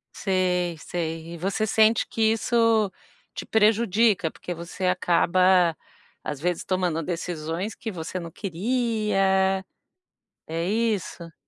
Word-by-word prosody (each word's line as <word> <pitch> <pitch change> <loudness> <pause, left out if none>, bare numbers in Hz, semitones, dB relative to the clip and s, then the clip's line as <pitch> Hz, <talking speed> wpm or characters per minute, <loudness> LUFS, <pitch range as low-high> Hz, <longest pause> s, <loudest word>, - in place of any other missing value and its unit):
Sei, 180 -3 0
sei. 165 -1 -4
E 170 - -7
você 195 +5 -1
sente 220 +2 +3
que 225 - -4
isso 225 -2 +2 0.4
te - - -6
prejudica, 215 -4 +3
porque 175 - -6
você 170 +3 -6
acaba, 180 -1 +3 0.5
às 145 -2 -4
vezes, 175 +2 -1
tomando 180 -4 0
decisões 170 +3 -4
que 225 - -6
você 175 0 -5
não 170 -2 -8
queria? 195 -2 0 0.8
É 165 +1 -2
isso? 205 -5 -2
185 Hz, 115 wpm, -25 LUFS, 170-215 Hz, 0.8 s, sente